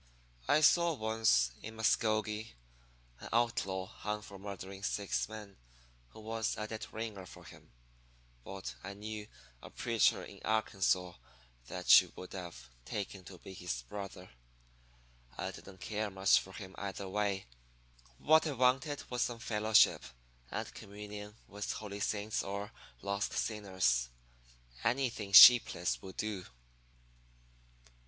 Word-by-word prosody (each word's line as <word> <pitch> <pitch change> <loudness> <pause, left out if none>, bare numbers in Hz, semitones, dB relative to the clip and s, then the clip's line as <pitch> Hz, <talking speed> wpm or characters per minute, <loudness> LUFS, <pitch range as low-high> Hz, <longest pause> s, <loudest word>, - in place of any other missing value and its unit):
I 155 - +4
saw 170 +2 +5
once, 110 - +2
in 110 +1 -8
Muscogee, 110 - 0 0.6
an - - -9
outlaw 105 -5 0
hung 105 +1 -5
for 100 -2 -11
murdering 95 -1 -8
six 100 +1 -1
men, 105 -3 -9 0.5
who 110 - -13
was 110 +1 -2
a 105 - -3
dead 110 0 -6
ringer 110 -4 -6
for - - -13
him. - - -15 0.7
But 95 +4 -7
I 100 +1 -7
knew 105 0 -6 0.3
a - - -10
preacher - - +2
in - - -12
Arkansas 95 -5 +1 0.5
that 90 +5 +7
you 90 - -11
would 90 - -9
have 85 -10 -8 0.2
taken 100 - -5
to 95 - -11
be 95 - -11
his 90 -10 -4
brother. 95 +3 -8 1.1
I - - -3
didn't 95 -1 -13
care 105 -1 -2
much 95 0 +4
for 95 - -11
him 95 -2 -9
either 100 0 -5
way; 100 -1 -1 0.7
what 160 +1 +4
I 150 - -2
wanted 130 +3 +1
was 125 - -1
some 120 - 0
fellowship 110 -1 +3 0.5
and - - -5
communion 105 +1 -9
with 105 +1 -4
holy 100 -1 -6
saints 105 +1 -1
or 100 +1 -5 0.3
lost 100 +1 -2
sinners 95 - 0 0.7
anything 120 -5 0
sheepless 100 - +8
would 95 - -10
do. 105 -4 -3
105 Hz, 130 wpm, -33 LUFS, 95-110 Hz, 1.1 s, sheepless